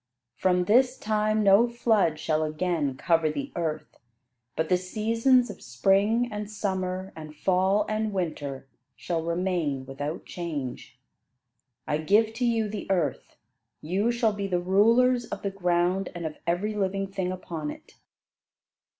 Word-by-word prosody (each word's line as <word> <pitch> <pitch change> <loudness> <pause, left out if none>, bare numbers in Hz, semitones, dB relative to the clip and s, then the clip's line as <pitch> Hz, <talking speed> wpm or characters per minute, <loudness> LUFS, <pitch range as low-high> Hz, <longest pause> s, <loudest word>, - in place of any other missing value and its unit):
From 180 +3 +2
this 250 +5 +4
time 215 0 +1
no 200 +4 +6
flood 220 -9 +2
shall 155 0 0
again 155 -3 -1
cover 165 0 +2
the 145 -2 -4
earth; 160 -3 -4 0.6
but 160 0 0
the 180 - +3
seasons 225 +6 +2
of 200 - -13
spring 200 - +2
and 210 0 -5
summer 190 -2 -3
and 155 -1 -9
fall 190 +5 +2
and 215 0 -1
winter, 150 -8 -3 0.3
shall 170 -2 -2
remain 170 -5 -1
without 145 +4 -5
change. 140 -7 -6 0.9
I 150 - -1
give 215 +7 +3
to 245 +2 -1
you 225 -2 +1
the 205 -1 -6
earth; 170 -8 -1 0.4
you 195 +9 0
shall 235 -2 +1
be 200 -1 -3
the 180 -2 0
rulers 230 +7 +3
of - - -7
the 200 - -1
ground 180 0 0
and 170 -1 -5
of 155 -1 -5
every 185 +5 0
living 195 -1 -1
thing 190 -2 -3
upon 165 -4 -5
it." - - -11
185 Hz, 145 wpm, -27 LUFS, 165-215 Hz, 0.9 s, no